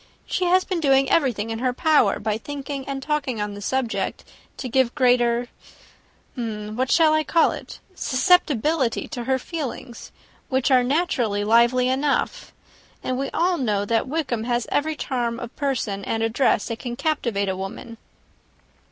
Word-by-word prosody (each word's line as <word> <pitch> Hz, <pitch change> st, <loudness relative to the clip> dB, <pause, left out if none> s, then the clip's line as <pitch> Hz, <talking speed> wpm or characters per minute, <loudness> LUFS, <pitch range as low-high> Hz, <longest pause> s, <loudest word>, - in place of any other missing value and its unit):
She 365 Hz, -, -1 dB
has 365 Hz, +1 st, +4 dB
been 370 Hz, -2 st, -2 dB
doing 270 Hz, -3 st, +3 dB
everything 230 Hz, -8 st, +1 dB
in 225 Hz, -, -3 dB
her 255 Hz, 0 st, 0 dB
power, 295 Hz, -, +3 dB
by 215 Hz, +1 st, -2 dB
thinking 280 Hz, 0 st, -5 dB
and 270 Hz, -1 st, -4 dB
talking 285 Hz, -6 st, -1 dB
on 210 Hz, 0 st, -3 dB
the 205 Hz, -, -8 dB
subject, 225 Hz, -4 st, -2 dB, 0.3 s
to 260 Hz, -, -4 dB
give 255 Hz, 0 st, +1 dB
greater 245 Hz, -1 st, +3 dB, 0.9 s
what 225 Hz, +1 st, -3 dB
shall 320 Hz, -2 st, +5 dB
I 310 Hz, 0 st, +2 dB
call 330 Hz, +1 st, +3 dB
it? -, -, -8 dB
susceptibility 300 Hz, -, +2 dB
to 240 Hz, -1 st, -5 dB
her 265 Hz, +1 st, +2 dB
feelings; 260 Hz, -4 st, -6 dB, 0.4 s
which 260 Hz, +1 st, +1 dB
are 255 Hz, -1 st, +5 dB
naturally 245 Hz, -, 0 dB
lively 235 Hz, +3 st, +4 dB
enough. 280 Hz, -, 0 dB, 0.5 s
And 255 Hz, 0 st, -2 dB
we 275 Hz, -, -2 dB
all 350 Hz, 0 st, +1 dB
know 210 Hz, -5 st, 0 dB
that 225 Hz, +4 st, 0 dB
Wickham 260 Hz, -6 st, -2 dB
has 240 Hz, -1 st, 0 dB
every 310 Hz, +2 st, 0 dB
charm 240 Hz, -5 st, -2 dB
of 240 Hz, -1 st, -8 dB
person 235 Hz, -8 st, -2 dB
and 225 Hz, 0 st, -1 dB
address 225 Hz, +4 st, +1 dB
that 230 Hz, -, -4 dB
can 240 Hz, -2 st, -5 dB
captivate 240 Hz, -8 st, -1 dB
a 190 Hz, -, -1 dB
woman." 215 Hz, +4 st, -7 dB
255 Hz, 160 wpm, -23 LUFS, 230-285 Hz, 0.9 s, shall